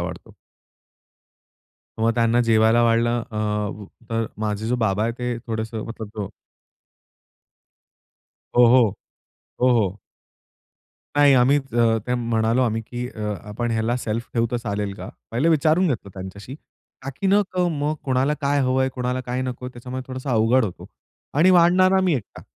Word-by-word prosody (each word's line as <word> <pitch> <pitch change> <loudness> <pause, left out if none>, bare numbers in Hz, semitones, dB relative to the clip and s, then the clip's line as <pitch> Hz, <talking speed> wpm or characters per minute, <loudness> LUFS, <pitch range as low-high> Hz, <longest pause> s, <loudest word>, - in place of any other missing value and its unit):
वाढतो." - - -7 1.7
मग 115 +1 +3
त्यांना 115 0 +2
जेवायला 115 0 +4
वाढलं 120 +1 +2
अ, 110 - -7 0.8
अ, 115 - +1 0.2
माझे 105 0 -2
जो 125 +2 0
बाबा 105 -3 0
आहेत, 115 +1 -1
ते 125 -1 -2
थोडंसं 110 -1 -4
मतलब 110 -2 -8
अ - - -7 2.3
हो, 120 0 +7
हो. 115 -4 +4 0.6
हो, 125 - +4
हो. 100 -1 -2 1.2
नाही, 145 -1 +6
आम्ही 130 +3 +4
ज 115 -1 +3
ते 125 - 0
म्हणालो 115 0 +1
आम्ही 115 -2 0
की 120 +2 -5
अ, 105 -4 -4
"आपण 120 +3 -3
ह्याला 115 +2 0
सेल्फ 115 -1 -4
ठेवू 115 -1 +2
तर 120 - -1
चालेल 105 -4 -3
का?" - - -8 0.2
पहिले 125 +8 +1
विचारून 160 +3 +3
घेतलं 110 -7 -3
त्यांच्याशी, 100 +6 -8 0.5
ताकी 135 +8 -4
न 200 +2 +5
क 185 - -1
मग 150 0 -1
कोणाला 135 +2 +1
काय 140 0 +1
हवंय, 130 0 +1
कोणाला 125 0 -2
काय 125 +1 -2
नकोय? 125 0 -5
त्याच्यामुळे 125 +1 -7
थोडासा 130 +1 -5
अवघड 115 +3 +3
होतो 95 -5 -7 0.5
आणि 165 +6 +5
वाढणारा 185 +2 +5
मी 180 -4 +2
एकटा. 120 -7 -6
120 Hz, 150 wpm, -22 LUFS, 110-130 Hz, 2.3 s, हो